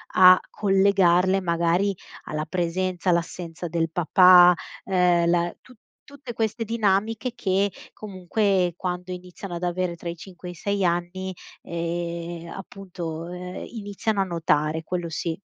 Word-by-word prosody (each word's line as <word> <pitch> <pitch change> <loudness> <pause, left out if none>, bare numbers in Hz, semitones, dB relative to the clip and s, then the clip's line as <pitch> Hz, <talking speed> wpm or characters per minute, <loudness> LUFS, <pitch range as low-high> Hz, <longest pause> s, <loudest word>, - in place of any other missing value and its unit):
a 185 0 +8
collegarle 195 -2 +3
magari 170 +3 +1 0.3
alla 155 0 -3
presenza, 180 +2 -1
all'assenza 170 0 -3
del 165 0 -1
papà, 180 +1 +7 0.3
ehm, 180 -2 +2
la 175 0 +1
tut 250 -3 -18 0.3
tutte 280 -3 -9
queste 225 0 -2
dinamiche 225 +2 0
che 195 -1 +1 0.2
comunque, 190 -2 0
quando 180 0 -4
iniziano 180 0 -7
ad 175 - -6
avere 175 0 -1
tra 170 - -8
i 170 - -3
5 180 +1 -11
e 175 - -5
i - - -9
6 200 +1 -1
anni, 175 +2 -2 0.3
ehm, 170 0 -4
appunto, 175 -3 -7
ehm, 180 0 -7
iniziano 205 -1 -2
a - - +3
notare, 160 -3 0
quello 175 0 -3
sì. 160 +1 -3
180 Hz, 135 wpm, -24 LUFS, 170-195 Hz, 0.3 s, a